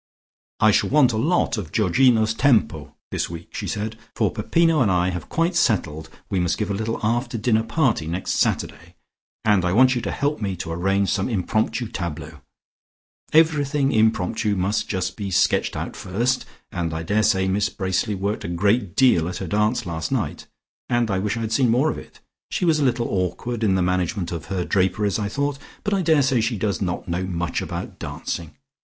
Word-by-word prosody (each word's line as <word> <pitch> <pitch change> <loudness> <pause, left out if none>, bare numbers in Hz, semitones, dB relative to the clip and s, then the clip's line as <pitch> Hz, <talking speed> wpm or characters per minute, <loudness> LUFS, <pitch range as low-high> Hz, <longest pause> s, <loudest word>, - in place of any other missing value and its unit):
"I 110 - +5
shall - - +2
want 135 -4 +4
a - - -1
lot 145 -2 +1
of 80 -6 -7
Georgino's 110 +2 +3
tempo 105 - +1 0.2
this - - -2
week," 85 0 -9
she - - -4
said, 110 +2 -4 0.2
"for - - +1
Peppino 165 -3 +2
and 110 - +3
I 90 0 +2
have 90 -1 -6
quite 170 +2 0
settled 80 - 0 0.2
we 95 - -1
must 90 -2 0
give 105 -2 -2
a - - 0
little 110 +3 -2
after 120 +2 0
dinner 110 0 +2
party 115 - 0
next 90 +3 -3
Saturday, - - -1 0.5
and 105 -4 +4
I 90 0 +1
want 130 +4 +5
you 120 - -1
to - - -3
help 145 -1 -1
me 100 -3 -2
to 85 -1 -6
arrange 95 +3 +1
some 95 +1 0
impromptu 110 +3 -1
tableaux. 80 -6 -6 0.9
Everything 150 -3 +3
impromptu 110 -1 +1
must 100 +4 -1
just 95 -2 -2
be 100 -3 -4
sketched 95 - +2
out - - -5
first, 120 +8 -1 0.2
and 85 -2 -3
I 80 - -3
daresay 100 +1 +2
Miss 100 +2 +1
Bracely 95 +2 -1
worked 100 +3 -2
a - - -4
great 100 +3 +1
deal 90 -11 +4
at 90 - -5
her 95 - -4
dance 105 +5 0
last 80 -2 -4
night - - -2 0.4
and 120 -3 +1
I 95 - +1
wish 105 +3 -1
I - - -3
had 110 -1 -3
seen 125 +1 +3
more 130 +7 +3
of - - -6
it. - - -15 0.3
She - - -1
was 160 -3 +3
a - - +1
little 120 -3 +1
awkward 100 +6 -2
in 95 -3 +3
the 95 - +2
management 90 +1 -1
of 85 -2 -5
her 95 -3 -2
draperies 95 +1 +1
I 100 -1 -2
thought, 140 +3 -2 0.2
but 205 - -1
I 195 - +2
daresay 140 -7 +3
she 110 0 -1
does 100 0 -1
not 90 -2 -3
know 85 +1 -1
much 90 -2 -2
about - - -6
dancing. 80 -3 -5
105 Hz, 200 wpm, -23 LUFS, 90-120 Hz, 0.9 s, I